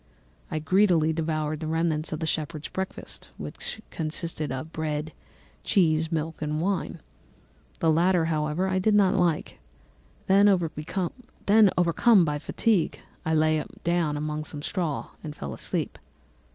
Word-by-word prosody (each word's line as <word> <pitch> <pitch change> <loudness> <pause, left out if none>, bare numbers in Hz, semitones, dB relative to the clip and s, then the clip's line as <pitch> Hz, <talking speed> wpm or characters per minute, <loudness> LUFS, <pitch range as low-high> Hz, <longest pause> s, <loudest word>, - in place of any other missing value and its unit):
I - - -2
greedily 165 -1 +3
devoured 155 -1 -1
the 160 - -4
remnants 160 -1 0
of 155 - -3
the - - 0
shepherd's 155 -1 -3
breakfast, 190 0 -6
which 220 - -6
consisted 155 -2 -3
of 130 +5 -5
bread, 155 -1 -3 0.5
cheese, 160 -4 +2
milk, 160 0 -2
and 150 0 -1
wine; 180 -2 -1 0.8
the 165 - +4
latter, 170 +1 +3
however, 155 +3 0
I 185 0 +1
did 210 +3 +3
not 200 -2 +5
like. 175 -5 0 0.7
Then, 200 +2 +6
overcome 190 - +2
by 150 -1 -1
fatigue, 200 +3 +1 0.3
I 160 - +2
lay 155 0 +3 0.2
down 170 -3 +1
among 150 0 -3
some 145 -2 -7
straw 170 -5 -2
and 150 -1 -6
fell 70 - -6
asleep. - - -3
160 Hz, 135 wpm, -26 LUFS, 155-185 Hz, 0.8 s, Then